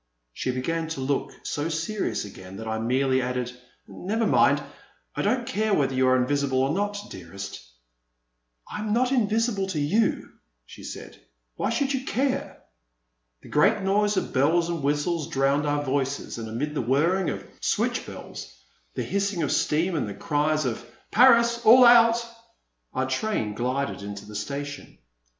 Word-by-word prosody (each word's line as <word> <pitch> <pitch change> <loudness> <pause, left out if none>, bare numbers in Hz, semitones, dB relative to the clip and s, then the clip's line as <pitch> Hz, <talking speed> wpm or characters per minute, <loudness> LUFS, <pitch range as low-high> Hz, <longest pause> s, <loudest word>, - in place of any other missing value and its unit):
*' - - -51
She - - -3
began 160 +6 -1
to 160 -3 -5
look 135 +1 -1
so 150 +3 -2
serious 170 - -2
again 95 -1 -10
that 110 - -7
I 110 0 -2
merely 130 +3 +1
added, 125 -1 -3 0.3
never 220 +5 -2
mind, - - +4 0.6
I - - -1
don't 250 -2 +1
care 215 -4 0
whether 135 -2 +1
you 130 0 +2
are 130 - +5
invisible 135 +1 0
or 135 +3 +2
not, 205 +2 -1
dearest." 100 -10 -8 1.0
I - - -6
am 210 0 -1
not 250 +2 +2
invisible 220 -4 +1
to 180 -5 -2
you,*' 190 +11 +1 0.3
she - - -13
said; - - -9 0.4
why - - -1
should 275 +4 0
you 265 -1 -2
care?" 265 0 -2 0.8
A - - -12
great 200 +7 +3
noise 205 +1 +2
of - - -2
bells 165 +6 +2
and 170 -2 -2
whistles 150 +3 0
drowned 140 -1 +1
our 145 0 0
voices, 135 -2 -2
and 110 -1 -6
amid 140 +7 -3
the 150 - -1
whirring 160 +9 +2
of - - -5
switch - - 0
bells, - - -9 0.4
the - - -2
hissing 200 -3 -1
of 145 - -1
steam, 165 +5 +1
and 145 - -1
the 100 - -6
cries 155 -1 0
of 120 -1 -3 0.3
Paris! 235 0 +5
All 250 +3 +8
out! 235 0 +6 0.4
" - - -48
our - - +1
train 205 - -1
glided 125 +3 -2
into 100 0 -7
the 105 - -11
station. 140 +7 -5
150 Hz, 170 wpm, -25 LUFS, 130-210 Hz, 1.0 s, All